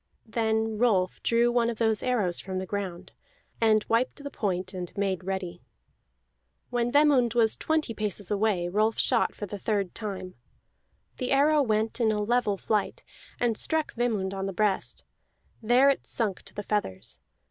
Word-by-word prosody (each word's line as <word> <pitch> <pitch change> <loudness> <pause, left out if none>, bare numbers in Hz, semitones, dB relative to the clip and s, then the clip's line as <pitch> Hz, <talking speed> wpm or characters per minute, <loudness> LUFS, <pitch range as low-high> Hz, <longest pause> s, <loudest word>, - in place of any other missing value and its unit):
Then 220 -1 -1
Rolf 195 -7 +2
drew 235 +1 +3
one 240 -1 +2
of 230 - -4
those 220 -2 +2
arrows 210 -9 0
from 190 -1 -5
the 190 - -3
ground, 185 -2 -5 0.5
and 215 -1 +4
wiped 250 +5 0
the 285 - -6
point, 185 -2 -2
and 180 -2 -5
made 195 -2 -1
ready. 185 -2 -4 1.1
When 240 -1 0
Vemund 275 -5 +4
was 225 -2 +3
twenty 315 -6 -1
paces 210 -2 -3
away 200 -4 +1
Rolf 215 +4 +1
shot - - +2
for 205 - -5
the 205 +1 -7
third 200 -3 -1
time. 195 -4 -6 0.8
The 255 -2 -3
arrow 295 +2 +4
went 220 -1 0
in 220 -2 +3
a 210 - -1
level 210 -1 +1
flight, 210 +1 -1 0.4
and 235 -2 +1
struck 315 +6 -1
Vemund 215 -6 -1
on 195 0 -3
the 195 - -4
breast; 205 0 0 0.6
there 245 +5 +5
it 275 - -3
sunk 210 -6 -1
to - - -11
the 205 - -4
feathers. 195 - -3
215 Hz, 165 wpm, -27 LUFS, 195-240 Hz, 1.1 s, there